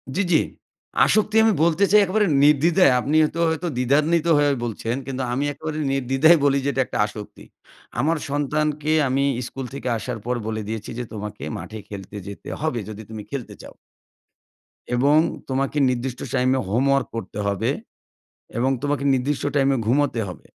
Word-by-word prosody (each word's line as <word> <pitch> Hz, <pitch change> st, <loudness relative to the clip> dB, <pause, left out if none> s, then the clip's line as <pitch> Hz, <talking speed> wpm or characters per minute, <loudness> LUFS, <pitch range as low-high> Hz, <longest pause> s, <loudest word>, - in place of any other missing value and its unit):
জ্বি, 200 Hz, -, +2 dB
জ্বি। 160 Hz, -, +5 dB, 0.6 s
আসক্তি 215 Hz, 0 st, +1 dB
আমি 220 Hz, -1 st, +4 dB
বলতে 170 Hz, +3 st, +2 dB
চাই 210 Hz, 0 st, +7 dB
একেবারে 210 Hz, +3 st, +1 dB, 0.2 s
নির্দ্বিধায়। 150 Hz, +2 st, +5 dB
আপনি 145 Hz, +4 st, -1 dB
এতো 165 Hz, -, -7 dB
হয়তো 160 Hz, +2 st, -2 dB
দ্বিধান্বিত 150 Hz, +6 st, +2 dB
হয়ে 145 Hz, 0 st, +3 dB
বলছেন। 115 Hz, 0 st, -3 dB
কিন্তু 135 Hz, -1 st, -3 dB
আমি 135 Hz, +3 st, 0 dB
একেবারে 155 Hz, +2 st, -5 dB, 0.2 s
নির্দ্বিধায় 135 Hz, +5 st, +4 dB
বলি 140 Hz, -1 st, +3 dB
যে, -, -, +2 dB
এটা 130 Hz, -, +1 dB
একটা -, -, -5 dB
আসক্তি। 105 Hz, 0 st, -9 dB, 0.6 s
আমার 160 Hz, +6 st, +2 dB
সন্তানকে 150 Hz, +1 st, -1 dB, 0.2 s
আমি 135 Hz, +2 st, +1 dB, 0.2 s
স্কুল 135 Hz, -1 st, -6 dB
থেকে 140 Hz, -1 st, -5 dB
আসার 120 Hz, +1 st, -5 dB
পর 125 Hz, +1 st, 0 dB
বলে 110 Hz, 0 st, -2 dB
দিয়েছি 110 Hz, -1 st, -5 dB
যে, -, -, -2 dB
"তোমাকে 105 Hz, -6 st, -6 dB
মাঠে 110 Hz, 0 st, -8 dB
খেলতে 100 Hz, 0 st, -8 dB
যেতে 100 Hz, -, -8 dB
হবে, 155 Hz, -6 st, -1 dB
যদি 110 Hz, 0 st, -7 dB
তুমি 110 Hz, -1 st, -7 dB
খেলতে 135 Hz, -4 st, -5 dB
চাও।" -, -, -12 dB, 1.2 s
"এবং 140 Hz, +5 st, +4 dB, 0.3 s
তোমাকে 135 Hz, +2 st, -1 dB
নির্দিষ্ট 125 Hz, 0 st, -3 dB
টাইমে 130 Hz, 0 st, +2 dB
হোমওয়ার্ক 135 Hz, +4 st, +2 dB
করতে 105 Hz, -2 st, -5 dB
হবে। 100 Hz, -2 st, -1 dB, 0.9 s
এবং 130 Hz, +3 st, +2 dB
তোমাকে 145 Hz, -1 st, -1 dB
নির্দিষ্ট 135 Hz, +2 st, -1 dB
টাইমে 135 Hz, -1 st, +3 dB
ঘুমাতে 130 Hz, +1 st, +1 dB
হবে। 90 Hz, -3 st, -9 dB
135 Hz, 160 wpm, -23 LUFS, 120-150 Hz, 1.2 s, চাই